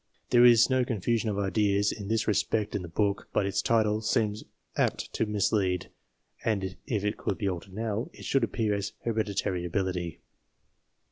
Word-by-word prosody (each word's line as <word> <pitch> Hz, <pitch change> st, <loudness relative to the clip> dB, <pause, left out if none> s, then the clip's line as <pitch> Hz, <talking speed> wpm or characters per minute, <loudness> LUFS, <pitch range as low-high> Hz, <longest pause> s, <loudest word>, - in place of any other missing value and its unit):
There 120 Hz, 0 st, +6 dB
is 120 Hz, -1 st, +7 dB
no 130 Hz, -1 st, +2 dB
confusion 115 Hz, 0 st, 0 dB
of 100 Hz, -, -2 dB
ideas 100 Hz, 0 st, +2 dB
in 100 Hz, -2 st, -6 dB
this 110 Hz, +1 st, 0 dB
respect 105 Hz, 0 st, +1 dB
in 100 Hz, -, -1 dB
the 90 Hz, -, -6 dB
book, 100 Hz, +4 st, -1 dB
but 100 Hz, -, +2 dB
its 100 Hz, -, 0 dB
title 110 Hz, -2 st, +2 dB
seems 110 Hz, -1 st, 0 dB, 0.3 s
apt -, -, -1 dB
to 110 Hz, -, 0 dB
mislead, 100 Hz, -3 st, 0 dB, 0.5 s
and 95 Hz, -4 st, -1 dB
if 110 Hz, -7 st, -1 dB
it 105 Hz, -, -1 dB
could -, -, -2 dB
be 100 Hz, -, -1 dB
altered 95 Hz, 0 st, -4 dB
now, 110 Hz, +1 st, -2 dB
it -, -, -12 dB
should 135 Hz, -3 st, +2 dB
appear 110 Hz, -2 st, 0 dB
as 100 Hz, 0 st, -3 dB
Hereditary 105 Hz, -5 st, -1 dB
Ability. 90 Hz, -2 st, -2 dB
105 Hz, 175 wpm, -28 LUFS, 100-115 Hz, 0.5 s, is